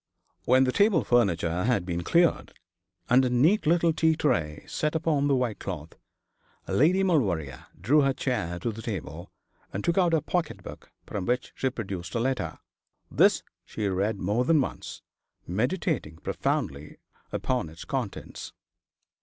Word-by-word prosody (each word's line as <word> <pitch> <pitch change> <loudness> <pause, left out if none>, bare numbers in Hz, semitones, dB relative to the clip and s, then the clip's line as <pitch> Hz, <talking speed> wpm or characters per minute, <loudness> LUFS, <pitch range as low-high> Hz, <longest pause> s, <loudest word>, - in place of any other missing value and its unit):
When 130 +2 +5
the 130 - +2
table 200 - +3
furniture 90 -7 +1
had 115 -7 +1
been 85 -1 -2
cleared, 170 - +2 0.5
and 125 +2 +5
a 130 - +1
neat 155 - +3
little 170 0 +3
tea 160 0 +3
tray 75 - -1
set 155 +1 -2
upon 155 -3 +1
the 140 - +3
white 125 -4 -1
cloth, 80 -5 -6 0.7
Lady 180 +7 +3
Maulevrier 90 - 0
drew 135 - +4
her 135 -1 +3
chair 120 -10 -2
to 115 +7 -2
the 110 +1 -8
table, 90 -5 -6 0.4
and 100 - -4
took 170 +2 +2
out 175 -3 +3
her 160 - +3
pocket 165 +1 -2
book, - - -11
from 100 -3 -4
which 125 +1 -1
she 130 - 0
produced 95 -6 -6
a - - +1
letter. 130 +2 -1 0.5
This - - +4 0.2
she 105 - -3
read 100 +3 0
more 105 +6 0
than 160 +3 +4
once, 130 - -4 0.4
meditating 125 - -1
profoundly 70 -2 -3 0.3
upon - - -1
its 80 +1 -11
contents. 130 -7 -5
125 Hz, 155 wpm, -27 LUFS, 90-155 Hz, 0.7 s, When